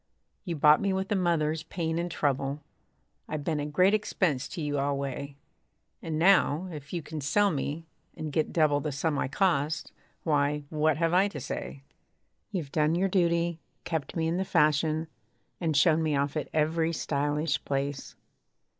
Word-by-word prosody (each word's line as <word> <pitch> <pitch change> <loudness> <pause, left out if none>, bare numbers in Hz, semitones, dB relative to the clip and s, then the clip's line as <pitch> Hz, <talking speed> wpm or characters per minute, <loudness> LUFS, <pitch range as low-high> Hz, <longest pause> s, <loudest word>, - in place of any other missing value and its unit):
You 170 - -2
bought 150 0 +5
me 200 -1 +1
with 190 +1 -2
a - - +3
mother's 160 -4 +1
pain 165 0 -3
and 175 +1 -2
trouble. 140 -2 -1 0.6
I've 155 -2 -4
been 155 -1 -1
a 145 - -2
great 185 +7 +3
expense 180 -9 0
to - - -7
you 145 -2 -1
alway. 140 0 -2 0.7
And 160 -2 -3
now, 180 -1 +4
if 145 -3 -9
you 170 -3 -3
can 155 +1 -6
sell 200 +9 +3
me, 150 +2 -3 0.3
and 155 -1 -4
get 155 +2 0
double 155 -3 +3
The 150 +1 -3
sum 145 +1 -1
I - - 0
cost 155 -1 0 0.3
why, 145 -1 +1
what 155 -1 +2
have 165 +1 +1
I 190 +3 +5
to 165 -8 -6
say? 135 0 -6 0.7
You've 170 -9 -4
done 155 +1 +2
your 190 +2 +1
duty: 170 -2 +1 0.2
kept 160 -5 -3
me 160 -1 0
in 165 +2 0
the 190 - 0
fashion, 155 -1 +2 0.5
And 160 -4 0
shown 160 +1 +4
me 155 -2 +1
off 140 +1 0
at 155 - -3
every 160 +2 +1
stylish 145 0 -1
place. 140 0 -3
155 Hz, 170 wpm, -28 LUFS, 145-170 Hz, 0.7 s, bought